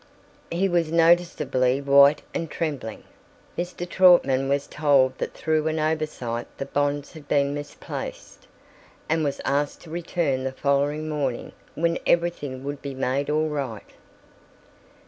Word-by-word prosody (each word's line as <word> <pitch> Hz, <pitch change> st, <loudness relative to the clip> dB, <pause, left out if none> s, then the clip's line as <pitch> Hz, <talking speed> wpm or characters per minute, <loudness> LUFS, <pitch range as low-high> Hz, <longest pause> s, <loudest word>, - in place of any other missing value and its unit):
He 180 Hz, +4 st, +1 dB
was 170 Hz, -3 st, +1 dB
noticeably 165 Hz, -6 st, +3 dB
white 140 Hz, +1 st, +5 dB
and 165 Hz, -2 st, -3 dB
trembling. 145 Hz, -11 st, -4 dB, 0.5 s
Mr. 175 Hz, 0 st, -4 dB
Trautman 170 Hz, -8 st, +4 dB
was 140 Hz, 0 st, +1 dB
told 140 Hz, -4 st, +2 dB
that -, -, -4 dB
through 155 Hz, -1 st, 0 dB
an 160 Hz, 0 st, -1 dB
oversight 155 Hz, -7 st, -2 dB
the 135 Hz, -, -4 dB
bonds 145 Hz, +2 st, -1 dB
had 155 Hz, -3 st, -12 dB
been 140 Hz, -1 st, +2 dB
misplaced, 145 Hz, 0 st, -7 dB, 0.6 s
and 160 Hz, 0 st, +1 dB
was 140 Hz, -2 st, -2 dB
asked 145 Hz, +1 st, 0 dB
to 165 Hz, -, -13 dB
return 165 Hz, -5 st, -1 dB
the 130 Hz, 0 st, -3 dB
following 145 Hz, +3 st, 0 dB
morning, 140 Hz, -5 st, -2 dB, 0.2 s
when 170 Hz, +1 st, 0 dB
everything 150 Hz, -6 st, 0 dB
would 145 Hz, 0 st, -5 dB
be 140 Hz, -2 st, -6 dB
made 135 Hz, +2 st, -1 dB
all 155 Hz, +1 st, +1 dB
right. 135 Hz, -8 st, -5 dB
145 Hz, 135 wpm, -24 LUFS, 140-160 Hz, 0.6 s, white